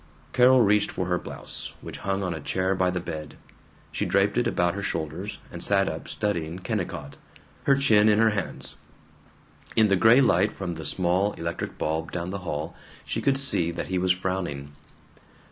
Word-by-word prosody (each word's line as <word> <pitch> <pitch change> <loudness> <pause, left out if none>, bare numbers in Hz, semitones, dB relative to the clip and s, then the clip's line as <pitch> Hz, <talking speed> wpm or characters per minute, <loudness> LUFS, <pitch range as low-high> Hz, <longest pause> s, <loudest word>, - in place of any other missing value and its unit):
Carol 125 +1 +6
reached 105 -1 +3
for 90 - -3
her 90 0 0
blouse, - - -5
which - - -8
hung 95 0 -1
on 90 -2 -1
a 80 - -5
chair 95 +6 0
by 90 -1 +1
the 90 0 -1
bed. 75 -3 -7 0.5
She - - -2
draped 100 +1 +2
it 120 -1 +2
about 90 -7 +1
her 100 - -4
shoulders, 85 +2 -4
and - - -6
sat - - +3
up - - -5
studying 85 -6 -2
Kennicott, 95 - -4 0.5
her 140 - +5
chin 110 -6 +4
in 105 - +4
her 110 0 +4
hands. 100 -4 -3 1.0
In 110 -2 +5
the 100 - +4
gray 110 +7 +6
light 100 -5 +3
from 90 -3 -4
the 80 -2 -7
small 90 +5 +1
electric 85 +1 -5
bulb 80 +1 -2
down 90 +1 -4
the 100 - -4
hall 80 -2 -4 0.3
she - - -2
could 135 -1 +2
see 135 -11 +3
that 85 - -5
he 95 -1 0
was 90 0 +2
frowning. 90 -7 -3
95 Hz, 185 wpm, -26 LUFS, 85-105 Hz, 1.0 s, Carol